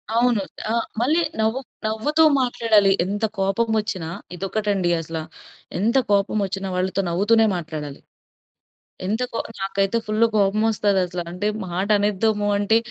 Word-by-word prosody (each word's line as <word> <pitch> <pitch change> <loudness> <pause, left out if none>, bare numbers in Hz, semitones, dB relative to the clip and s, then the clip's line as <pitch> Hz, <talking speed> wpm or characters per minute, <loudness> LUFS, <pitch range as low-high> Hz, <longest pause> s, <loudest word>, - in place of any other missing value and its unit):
అవును. 235 -4 +3 0.3
ఆ! - - +1 0.3
మళ్ళి 300 +8 +2 0.2
నవ్వు 220 +4 +1 0.3
నవ్వుతూ 290 +9 +2 0.2
మాట్లాడాలి. 220 -5 +3
ఎంత 205 +3 -1
కోపం 195 +4 +1
వచ్చినా 185 -6 -4 0.3
ఇదొకటండసలా. 175 -5 -1 0.6
ఎంత 230 +6 +2
కోపం 200 +1 +2
వచ్చిన 195 0 -4
వాళ్ళతో 185 +1 0
నవ్వుతూనే 220 +6 +3
మాట్లాడాలి. 150 -4 -6 1.0
ఎంత 220 +6 0
కో - - -2 0.2
నాకైతే 195 +3 0
ఫుల్లు 215 +2 +2
కోపమొస్తదసల. 200 -3 +1
అంటే 180 +4 -2 0.2
మాటనేద్దాము 205 +3 +1
అంటే, 205 +2 +3
205 Hz, 110 wpm, -22 LUFS, 190-220 Hz, 1.0 s, అవును